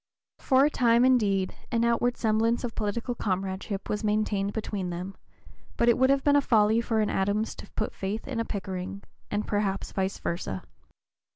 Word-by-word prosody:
For 265 +1 +4
a - - +3
time, 235 -1 +4
indeed, 200 -7 +2 0.2
an 235 0 +2
outward 240 +1 +1
semblance 225 +2 +1
of 240 -2 -3
political 230 +3 -2
comradeship 195 -1 -3
was 210 0 -2
maintained 210 -2 0
between 205 -4 -3
them, 180 +3 -5 0.6
but 235 - +2
it 235 - +5
would 260 +1 +3
have 275 0 +3
been 285 0 +5
folly 220 -3 +3
for 225 -2 0
an 210 - +1
Adams 205 +3 0
to - - -10
put 215 - -2
faith 200 +3 -4
in 260 -4 -3
a - - +1
Pickering, 195 -2 -5 0.3
and 210 +1 -1
perhaps 200 -2 -1
vice 190 0 -1
versa. 130 - -4
215 Hz, 175 wpm, -27 LUFS, 195-235 Hz, 0.6 s, it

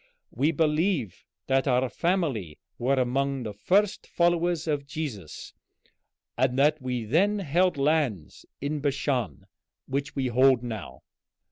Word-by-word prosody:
We 140 +7 +1
believe 155 - 0 0.2
that 135 +1 +1
our 130 0 +2
family 140 - -1 0.2
were 130 +3 +2
among 135 +1 0
the 105 -2 -5
first 190 - +1
followers 175 -1 +1
of 145 -3 -2
Jesus, 140 - -6 0.8
and 130 +1 +1
that 150 +2 +3
we 125 -3 -3
then 190 - +2
held 180 -1 +1
lands 140 - -1
in 145 +2 -2
Bashan 135 - -1 0.4
which 140 +2 -3
we 135 - -1
hold 130 0 +4
now. 115 -3 -7
140 Hz, 125 wpm, -27 LUFS, 125-160 Hz, 0.8 s, hold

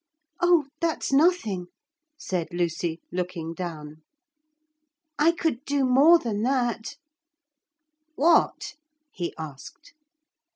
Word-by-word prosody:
'Oh, 350 -4 +4
that's 330 -4 -1
nothing,' 270 - +2 0.5
said 180 - -3
Lucy, 170 -1 -2
looking 175 -2 -4
down. 155 -4 -7 1.2
'I 325 +3 +4
could 320 -7 -2
do 285 -2 0
more 280 +7 +6
than 220 -8 -3
that.' 240 0 -1 1.2
'What?' 320 -1 +2 0.4
he 175 -2 -4
asked. 155 - -10
230 Hz, 90 wpm, -25 LUFS, -, 1.2 s, more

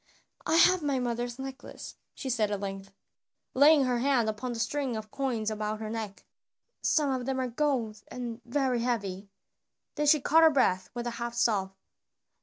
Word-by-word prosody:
"I 315 - +2
have 355 +2 +6
my 285 -3 0
mother's 240 -1 -2
necklace," 270 +1 -8 0.2
she 275 - -6
said 225 -5 +1
at 205 -1 -2
length, 195 0 -6 0.6
laying 290 +2 +6
her 250 -2 0
hand 250 -4 +2
upon 240 +4 -4
the 235 - -5
string 265 +1 -1
of 215 -1 -8
coins 235 -6 -1
about 215 0 -3
her 215 -1 -5
neck. 220 -3 -6 0.6
"Some 295 -3 +2
of 255 -1 -2
them 265 -1 -1
are - - 0
of 245 -2 -5
gold 245 -8 0
and 240 -2 -6
very 255 0 0
heavy." 200 -5 -2 0.6
Then 295 -1 -1
she 305 +1 +6
caught 315 +4 +4
her 320 - +8
breath 220 -11 +1
with 240 0 -4
a 240 - -2
half 235 0 -3
sob. 200 -5 +1
240 Hz, 185 wpm, -29 LUFS, 215-270 Hz, 0.6 s, her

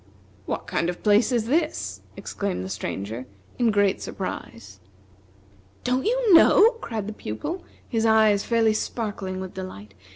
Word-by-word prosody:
"What - - -3
kind 170 - -1
of 180 - -2
a - - -22
place 210 +4 +3
is 235 -3 +1
this?" 310 +6 -1 0.2
exclaimed 200 - -3
the - - -6
Stranger, 105 +4 -5 0.3
in 240 -2 +3
great 205 -2 +2
surprise. 100 -1 -7 1.0
"Don't 250 +1 0
you 480 -3 +3
know?" 415 +6 +7
cried 220 -3 -4
the 215 - -5
Pupil, 210 - -5 0.2
his 225 -2 -1
eyes 220 -2 +4
fairly 225 -2 +2
sparkling 205 -4 -3
with 190 -1 -6
delight. 105 - -8
210 Hz, 150 wpm, -24 LUFS, 185-235 Hz, 1.0 s, know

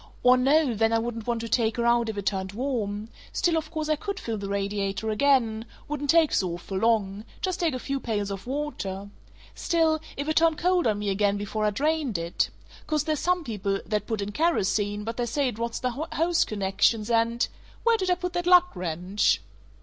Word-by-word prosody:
"Or 250 0 +7
no, 275 +1 +3
then 225 +1 +2
I - - +4
wouldn't 230 -1 -4
want 235 -1 0
to 230 - -4
take 230 -1 +1
her 235 - 0
out 235 -1 +3
if 215 - -4
it 200 - -4
turned 190 -1 -1
warm 220 -4 -2 0.2
still, 345 -2 +1
of 315 -1 -2
course, 310 -1 -3
I 310 - +2
could 400 +5 -5
fill 225 -2 -4
the 200 0 -5
radiator 200 +1 -1
again 230 -2 +2 0.2
wouldn't 290 -1 -4
take 330 -1 +5
so 180 -3 +1
awful 190 +2 -4
long 210 -2 +1 0.2
just 370 -1 -2
take 330 -6 +1
a - - -3
few 275 +2 -3
pails 205 -5 -2
of 195 +3 -6
water 200 -9 -4 0.4
still, 325 -2 +1 0.2
if 285 +2 -3
it 310 - 0
turned 325 -1 +4
cold 360 -3 +2
on 215 -2 +1
me 205 0 -2
again 200 +1 +1
before 210 +1 -2
I - - +4
drained 285 - 0
it 170 +1 -1 0.4
Course 305 -2 +1
there's 310 -2 -1
some 360 -1 +1
people 200 -6 -2
that 210 -1 -2
put 220 -3 -2
in 200 +1 -3
kerosene, 205 - +1
but 230 +1 -5
they 240 -1 -1
say 275 +4 0
it 225 - -8
rots 235 0 -2
the 250 - -1
hose 325 +5 0
connections 210 +2 +1
and 230 +1 +2 0.4
Where 465 0 +4
did 375 -3 -1
I 360 - +4
put 360 0 -4
that 350 0 -2
lug 360 0 +6
wrench?" 180 - 0
230 Hz, 215 wpm, -26 LUFS, 205-305 Hz, 0.4 s, Or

